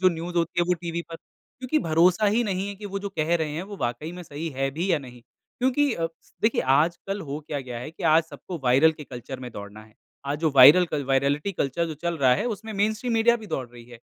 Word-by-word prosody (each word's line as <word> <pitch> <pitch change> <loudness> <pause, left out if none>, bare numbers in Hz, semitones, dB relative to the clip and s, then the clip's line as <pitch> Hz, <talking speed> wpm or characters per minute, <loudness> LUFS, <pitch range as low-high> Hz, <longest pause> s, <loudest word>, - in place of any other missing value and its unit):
जो 185 - +6
न्यूज़ 175 0 -5
होती 170 +1 +1
है - - +3
वो 180 - +4
टीवी 170 0 -4
पर 165 - -6
क्योंकि 260 - -5
भरोसा 175 +6 +4
ही 220 +4 +3
नहीं 195 -1 -2
है 200 - -5
कि 205 +1 -8
वो 200 0 -4
जो 200 - -5
कह 160 +3 +2
रहे 160 -2 -2
हैं 165 +4 -3
वो 200 +1 -8
वाक़ई 120 +8 -3
में 180 0 -8
सही 160 +1 -6
है 135 0 0
भी 170 +7 -2
या 160 - +3
नहीं। 125 -3 -12 0.4
क्योंकि 260 +2 +2
अ, 165 -4 -1 0.4
देखिए 220 - +3 0.2
आजकल 175 +6 0
हो 145 - -3
क्या 145 -2 -2
गया 125 -2 -7
है 125 +6 -7
कि 170 - -12
आज 165 +1 +5
सबको 165 +3 -8
वायरल 135 +6 +5
के 150 -1 -10
कल्चर 130 +1 -8
में 125 - -7
दौड़ना 100 +1 -9
है 110 - -22 0.4
आज 145 - -1
जो 160 0 +1
वायरल 145 +8 +9
कल 145 -3 -2
वाइरेलिटी 140 +7 +1
कल्चर 170 +1 -1
जो 160 - -5
चल 170 -1 0
रहा 130 -2 +5
है 135 - -2
उसमें 220 +2 -9
मेनस्ट्रीम 215 +4 0
मीडिया 230 +1 +4
भी 220 -2 -11
दौड़ 135 -7 -3
रही 120 -1 -14
है। 120 - -11
165 Hz, 255 wpm, -25 LUFS, 140-195 Hz, 0.4 s, वायरल